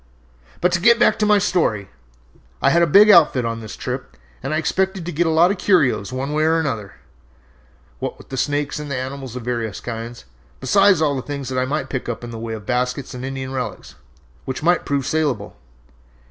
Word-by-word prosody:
"But 180 Hz, +2 st, +3 dB
to 175 Hz, -1 st, 0 dB
get 235 Hz, +4 st, +6 dB
back 240 Hz, -, +3 dB
to 210 Hz, -, +2 dB
my 210 Hz, 0 st, +5 dB
story. 115 Hz, -, 0 dB, 0.7 s
I -, -, +3 dB
had 170 Hz, -, +4 dB
a 170 Hz, -, +4 dB
big 205 Hz, +7 st, +7 dB
outfit 140 Hz, -9 st, +5 dB
on 115 Hz, 0 st, -3 dB
this 110 Hz, -3 st, -8 dB
trip -, -, -6 dB, 0.2 s
and -, -, -4 dB
I 155 Hz, -, +1 dB
expected 190 Hz, +2 st, -1 dB
to 175 Hz, -, -4 dB
get 170 Hz, +2 st, +1 dB
a -, -, +2 dB
lot 165 Hz, +3 st, +4 dB
of 200 Hz, -, -4 dB
curios 130 Hz, -, +2 dB
one 135 Hz, +3 st, -3 dB
way 155 Hz, +1 st, +1 dB
and 160 Hz, +1 st, +3 dB
another, 115 Hz, -12 st, -2 dB, 1.1 s
what -, -, -4 dB
with 130 Hz, -, -7 dB
snakes 145 Hz, +2 st, -1 dB
and 150 Hz, -1 st, -6 dB
animals 130 Hz, -1 st, -5 dB
of 125 Hz, -, -6 dB
various 115 Hz, -3 st, -3 dB
kinds, 115 Hz, -, -7 dB, 0.3 s
besides 190 Hz, +5 st, +4 dB
all 145 Hz, -2 st, +1 dB
the 130 Hz, -, -2 dB
things 140 Hz, -1 st, -5 dB
that 130 Hz, -1 st, -1 dB
I 130 Hz, -, +1 dB
might 150 Hz, +4 st, -3 dB
pick 130 Hz, -2 st, -3 dB
up 120 Hz, -, -5 dB
in 120 Hz, -, -7 dB
the 115 Hz, -, -7 dB
way 115 Hz, 0 st, -5 dB
of 105 Hz, -2 st, -10 dB
baskets 125 Hz, +1 st, -2 dB
and 125 Hz, 0 st, -7 dB
Indian 135 Hz, 0 st, -5 dB
relics, 125 Hz, -, -5 dB, 0.5 s
which 130 Hz, +2 st, -5 dB
might 175 Hz, +2 st, +2 dB
prove 140 Hz, -2 st, 0 dB
salable. 140 Hz, -10 st, -1 dB
140 Hz, 210 wpm, -21 LUFS, 125-165 Hz, 1.1 s, big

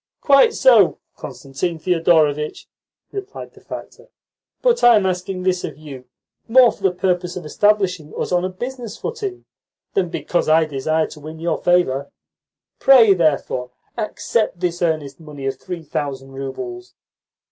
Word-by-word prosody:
"Quite 285 Hz, +11 st, +5 dB
so, -, -, +5 dB, 0.2 s
Constantine 160 Hz, +5 st, -5 dB
Thedorovitch," 160 Hz, -3 st, +1 dB, 0.5 s
replied 400 Hz, +1 st, -8 dB
the -, -, -18 dB
factor. -, -, -10 dB, 0.6 s
"But -, -, +2 dB
I 240 Hz, -1 st, +8 dB
am 205 Hz, -3 st, +2 dB
asking 185 Hz, 0 st, -2 dB
this 185 Hz, -1 st, 0 dB
of 145 Hz, -, -6 dB
you 140 Hz, -4 st, -10 dB, 0.4 s
more 245 Hz, +1 st, +6 dB
for -, -, -16 dB
the 195 Hz, -, +3 dB
purpose 180 Hz, -1 st, -1 dB
of 180 Hz, -3 st, -7 dB
establishing 185 Hz, -2 st, +1 dB
us -, -, -3 dB
on 180 Hz, 0 st, +2 dB
a 185 Hz, -, -1 dB
business 235 Hz, +3 st, -7 dB
footing 415 Hz, -5 st, -5 dB, 0.5 s
than 185 Hz, -3 st, 0 dB
because 175 Hz, 0 st, -1 dB
I 160 Hz, +1 st, +5 dB
desire 155 Hz, +2 st, 0 dB
to 150 Hz, -, -11 dB
win 155 Hz, +2 st, -9 dB
your 170 Hz, +2 st, -2 dB
favour. 160 Hz, -6 st, +1 dB, 0.7 s
Prey, 240 Hz, -7 st, +7 dB
therefore, 145 Hz, -7 st, 0 dB, 0.3 s
accept 215 Hz, -3 st, -2 dB
this 175 Hz, -1 st, -2 dB
earnest 155 Hz, -5 st, -1 dB
money 150 Hz, -4 st, -9 dB
of 135 Hz, -1 st, -3 dB
three 175 Hz, -3 st, -7 dB
thousand 135 Hz, -3 st, -4 dB
roubles." 360 Hz, -, -7 dB
175 Hz, 145 wpm, -20 LUFS, 150-210 Hz, 0.7 s, I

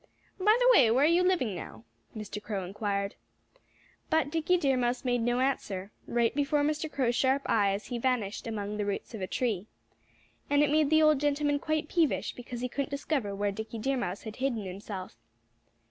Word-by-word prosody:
"By 425 Hz, +4 st, +5 dB
the -, -, +4 dB
way, 255 Hz, -, +6 dB
where 250 Hz, +5 st, +3 dB
are -, -, +6 dB
you 340 Hz, +2 st, +4 dB
living 360 Hz, -, +1 dB
now?" 115 Hz, -10 st, -8 dB, 0.3 s
Mr. 210 Hz, -1 st, -6 dB
Crow 200 Hz, -3 st, -4 dB
inquired. 200 Hz, +1 st, -2 dB, 1.0 s
But 315 Hz, -2 st, +2 dB
Dickie 330 Hz, +3 st, +2 dB
Deer 275 Hz, -6 st, +2 dB
Mouse 245 Hz, +1 st, -1 dB
made 245 Hz, -1 st, +1 dB
no 240 Hz, +2 st, +1 dB
answer. 205 Hz, -7 st, -2 dB, 0.2 s
Right 235 Hz, -1 st, +1 dB
before 290 Hz, +1 st, +1 dB
Mr. 305 Hz, +1 st, -1 dB
Crow's 245 Hz, -4 st, 0 dB
sharp 270 Hz, +2 st, +2 dB
eyes 200 Hz, -2 st, +1 dB
he 245 Hz, -, -4 dB
vanished 230 Hz, -4 st, -1 dB
among 210 Hz, -2 st, -4 dB
the 205 Hz, -, -1 dB
roots 200 Hz, -, -4 dB
of 220 Hz, -, -6 dB
a 185 Hz, -, -2 dB
tree. 215 Hz, -5 st, -1 dB, 0.8 s
And 285 Hz, +1 st, +4 dB
it 290 Hz, -, +2 dB
made 305 Hz, -1 st, +3 dB
the 315 Hz, 0 st, +5 dB
old 305 Hz, -2 st, +5 dB
gentleman 290 Hz, 0 st, +1 dB
quite 310 Hz, 0 st, -1 dB
peevish 330 Hz, -3 st, +1 dB
because 245 Hz, -1 st, -7 dB
he 250 Hz, -, -1 dB
couldn't 280 Hz, +3 st, -3 dB
discover 280 Hz, -7 st, -2 dB
where 205 Hz, 0 st, 0 dB
Dickie 220 Hz, +3 st, -6 dB
Deer 270 Hz, +5 st, 0 dB
Mouse 195 Hz, -5 st, -3 dB
had 220 Hz, -1 st, -8 dB
hidden 255 Hz, -6 st, -1 dB
himself. 185 Hz, -, -7 dB
245 Hz, 190 wpm, -29 LUFS, 210-290 Hz, 1.0 s, way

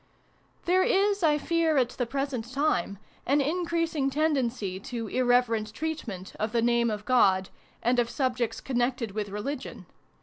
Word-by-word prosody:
There 365 Hz, +2 st, +4 dB
is, 400 Hz, +2 st, +2 dB
I 305 Hz, -3 st, +4 dB
fear, 325 Hz, 0 st, +1 dB
at 250 Hz, -2 st, +3 dB
the 245 Hz, -1 st, -3 dB
present 265 Hz, -3 st, -3 dB
time, 255 Hz, -, 0 dB, 0.3 s
an 280 Hz, +2 st, +3 dB
increasing 330 Hz, -1 st, 0 dB
tendency 260 Hz, -10 st, 0 dB
to 230 Hz, +1 st, -5 dB
irreverent 245 Hz, -3 st, +1 dB
treatment 240 Hz, -, -5 dB
of 215 Hz, +1 st, -2 dB
the 235 Hz, -, +2 dB
name 235 Hz, 0 st, +3 dB
of 210 Hz, -1 st, -4 dB
God 245 Hz, -7 st, +5 dB
PREFACE. 190 Hz, 0 st, -7 dB
xxiii -, -, -32 dB
and 245 Hz, +1 st, +3 dB
of 235 Hz, -1 st, +1 dB
subjects 250 Hz, -4 st, -1 dB
connected 245 Hz, -3 st, -1 dB
with 205 Hz, 0 st, -3 dB
religion. 255 Hz, +7 st, -5 dB
250 Hz, 160 wpm, -27 LUFS, 225-295 Hz, 0.3 s, God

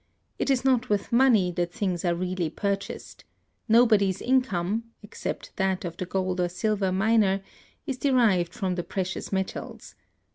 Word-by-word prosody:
It -, -, 0 dB
is 265 Hz, -1 st, +1 dB
not 255 Hz, -2 st, +2 dB
with 205 Hz, -1 st, 0 dB
money 235 Hz, -7 st, +4 dB
that 175 Hz, -1 st, -2 dB
things 185 Hz, -5 st, -2 dB
are 175 Hz, -1 st, +1 dB
really 180 Hz, -1 st, -2 dB
purchased. 200 Hz, +4 st, -4 dB, 0.5 s
Nobody's 215 Hz, -5 st, +4 dB
income 225 Hz, -5 st, 0 dB, 0.2 s
(except 210 Hz, -, -6 dB
that 190 Hz, -1 st, 0 dB
of 170 Hz, -, -5 dB
the 185 Hz, -, -5 dB
gold 185 Hz, -1 st, -1 dB
or 175 Hz, -, +1 dB
silver 200 Hz, +1 st, 0 dB
miner) 195 Hz, 0 st, +2 dB, 0.4 s
is 270 Hz, -4 st, -4 dB
derived 225 Hz, -11 st, +3 dB
from 185 Hz, 0 st, -2 dB
the 175 Hz, -1 st, -3 dB
precious 190 Hz, 0 st, -4 dB
metals. 190 Hz, -1 st, -4 dB
195 Hz, 150 wpm, -26 LUFS, 180-225 Hz, 0.5 s, money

